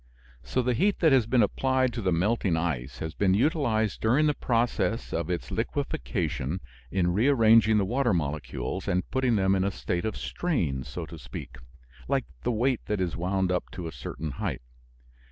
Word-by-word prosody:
So, 125 Hz, -, -1 dB
the 125 Hz, +1 st, +1 dB
heat 200 Hz, -, +2 dB
that 160 Hz, -3 st, +4 dB
has 130 Hz, -5 st, +4 dB
been 120 Hz, -2 st, +4 dB
applied 130 Hz, +3 st, +1 dB
to 120 Hz, -, -3 dB
the 95 Hz, -2 st, +1 dB
melting 95 Hz, 0 st, +1 dB
ice 70 Hz, -7 st, -2 dB
has 80 Hz, -1 st, -5 dB
been 95 Hz, 0 st, +2 dB
utilized 120 Hz, -, +1 dB
during 130 Hz, +8 st, +3 dB
the 150 Hz, -, +3 dB
process 120 Hz, -2 st, 0 dB
of 85 Hz, 0 st, -2 dB
its 90 Hz, -2 st, -3 dB
liquefaction 70 Hz, +8 st, -2 dB, 0.3 s
in 90 Hz, 0 st, +1 dB
rearranging 110 Hz, -2 st, +5 dB
the 100 Hz, -, +2 dB
water 125 Hz, +3 st, +1 dB
molecules 75 Hz, +3 st, -2 dB
and 90 Hz, -2 st, 0 dB
putting 130 Hz, -3 st, +2 dB
them 95 Hz, -1 st, +3 dB
in 95 Hz, -1 st, +2 dB
a 100 Hz, -, +2 dB
state 90 Hz, -1 st, -3 dB
of 110 Hz, -, -2 dB
strain, 85 Hz, -, -1 dB
so -, -, -6 dB
to -, -, -10 dB
speak, -, -, -8 dB, 0.5 s
like -, -, +1 dB, 0.2 s
the -, -, 0 dB
weight 120 Hz, +2 st, +1 dB
that 105 Hz, -2 st, -1 dB
is 90 Hz, -3 st, -1 dB
wound 95 Hz, +1 st, 0 dB
up 90 Hz, -, -1 dB
to 90 Hz, -, -6 dB
a -, -, -5 dB
certain 75 Hz, +2 st, -6 dB
height. 65 Hz, -, -4 dB
105 Hz, 185 wpm, -27 LUFS, 90-125 Hz, 0.5 s, rearranging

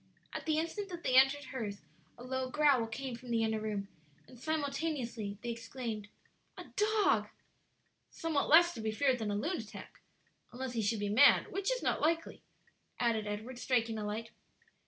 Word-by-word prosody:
At -, -, -5 dB
the 310 Hz, -1 st, +2 dB
instant 360 Hz, +6 st, -2 dB
that 345 Hz, -2 st, -7 dB
they 255 Hz, -, +1 dB
entered 270 Hz, +2 st, +6 dB
hers 210 Hz, -6 st, -4 dB, 0.3 s
a 240 Hz, -, -10 dB
low 260 Hz, 0 st, -2 dB
growl 280 Hz, -5 st, +3 dB
came 250 Hz, +3 st, -5 dB
from 245 Hz, +1 st, -11 dB
the 230 Hz, -1 st, +2 dB
inner 220 Hz, -1 st, 0 dB
room, 210 Hz, -2 st, -3 dB, 0.4 s
and 250 Hz, -, -15 dB
simultaneously 275 Hz, -8 st, -2 dB
they 240 Hz, -, -2 dB
exclaimed, 230 Hz, -2 st, -5 dB, 0.5 s
"A -, -, -6 dB
dog!" 425 Hz, 0 st, +3 dB, 0.8 s
"Somewhat 320 Hz, -3 st, -1 dB
less 345 Hz, +3 st, +7 dB
to 225 Hz, -, -6 dB
be 220 Hz, 0 st, -1 dB
feared 260 Hz, +2 st, +2 dB
than 220 Hz, -2 st, -2 dB
a 205 Hz, -, 0 dB
lunatic, 285 Hz, -, -4 dB, 0.5 s
unless 255 Hz, 0 st, -5 dB
he 230 Hz, -, 0 dB
should 215 Hz, +1 st, 0 dB
be 205 Hz, -, -1 dB
mad, 250 Hz, +8 st, +6 dB
which 390 Hz, +3 st, -1 dB
is -, -, -2 dB
not -, -, +1 dB
likely," 330 Hz, +1 st, 0 dB, 0.6 s
added 225 Hz, -3 st, +1 dB
Edward, 220 Hz, +5 st, -5 dB
striking 230 Hz, -3 st, +1 dB
a -, -, -3 dB
light. 220 Hz, +2 st, -4 dB
250 Hz, 175 wpm, -33 LUFS, 220-300 Hz, 0.8 s, less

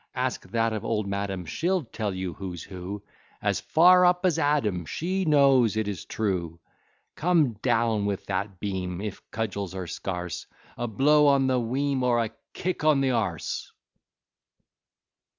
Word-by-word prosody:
Ask -, -, -2 dB
that 115 Hz, +1 st, +1 dB
of 110 Hz, -, -3 dB
old 105 Hz, -2 st, -1 dB
madam: 100 Hz, -2 st, -3 dB
She'll 175 Hz, -, 0 dB
tell 110 Hz, -3 st, -4 dB
you 95 Hz, -2 st, -4 dB
who's 90 Hz, -2 st, -6 dB
who, 95 Hz, +2 st, -7 dB, 0.4 s
As -, -, 0 dB
far 180 Hz, +3 st, +6 dB
up 180 Hz, +1 st, +3 dB
as 170 Hz, -3 st, +2 dB
Adam, 135 Hz, -, +1 dB
She 185 Hz, -, -2 dB
knows 135 Hz, -7 st, +4 dB
it 110 Hz, -1 st, 0 dB
is 100 Hz, -5 st, -4 dB
true. 90 Hz, -6 st, -2 dB, 0.5 s
Come 160 Hz, -7 st, +2 dB
down 110 Hz, -2 st, +1 dB
with 100 Hz, -2 st, -3 dB
that 100 Hz, -1 st, -3 dB
beam, 95 Hz, -3 st, -3 dB
If 105 Hz, -1 st, -5 dB
cudgels 100 Hz, -3 st, -3 dB
are 95 Hz, -1 st, -4 dB
scarce, 90 Hz, 0 st, -5 dB, 0.3 s
A 120 Hz, -, -3 dB
blow 145 Hz, +7 st, +4 dB
on 140 Hz, -1 st, +4 dB
the 130 Hz, -1 st, +2 dB
weam, 135 Hz, +3 st, -1 dB
Or 125 Hz, -1 st, +2 dB
a 115 Hz, -2 st, 0 dB, 0.2 s
kick 180 Hz, -3 st, -3 dB
on 155 Hz, -3 st, +4 dB
the 135 Hz, -, +2 dB
a 100 Hz, -7 st, 0 dB
se. -, -, -5 dB
110 Hz, 160 wpm, -26 LUFS, 95-140 Hz, 0.5 s, far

